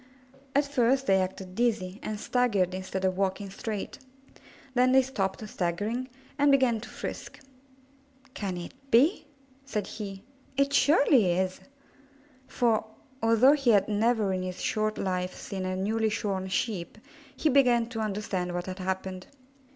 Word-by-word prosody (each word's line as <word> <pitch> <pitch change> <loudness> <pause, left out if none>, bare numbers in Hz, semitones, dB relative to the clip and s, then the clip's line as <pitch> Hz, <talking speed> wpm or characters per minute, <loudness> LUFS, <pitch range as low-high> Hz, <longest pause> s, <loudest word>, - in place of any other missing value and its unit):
At 285 +1 +4
first 265 -1 +2
they 190 -4 +4
acted 185 0 -5
dizzy, 215 -4 0
and 215 -1 -4
staggered 205 -8 +1
instead 190 0 -3
of 185 0 0
walking 195 0 -1
straight; 210 0 -5 0.7
then 255 0 +4
they 265 0 +6
stopped 215 -5 -3
staggering 210 +8 -2 0.3
and 285 0 +5
began 255 -5 +3
to 245 - -9
frisk. - - -7 0.9
'^Can 180 -4 -4
it - - -12 0.2
be?" 290 - +4 0.4
said 215 -7 -3
he. 195 -2 -7 0.3
^'It 280 0 +2
surely 275 - +4
is!" 185 +1 -1 0.9
For, 230 -3 +1 0.4
although 230 +5 +5
he 275 -4 +1
had 205 -4 +5
never 215 -1 +1
in 185 - -1
his 185 0 -5
short 215 0 -1
life 185 -1 -2
seen 190 -2 -5
a 185 - -2
newly 220 +4 0
shorn 195 -3 -2
Sheep, 185 -1 -2 0.4
he - - +1
began 250 -4 +4
to 230 -2 -5
understand 195 -4 -2
what 175 0 -3
had 185 0 -6
happened. 185 0 -4
210 Hz, 145 wpm, -28 LUFS, 190-245 Hz, 0.9 s, they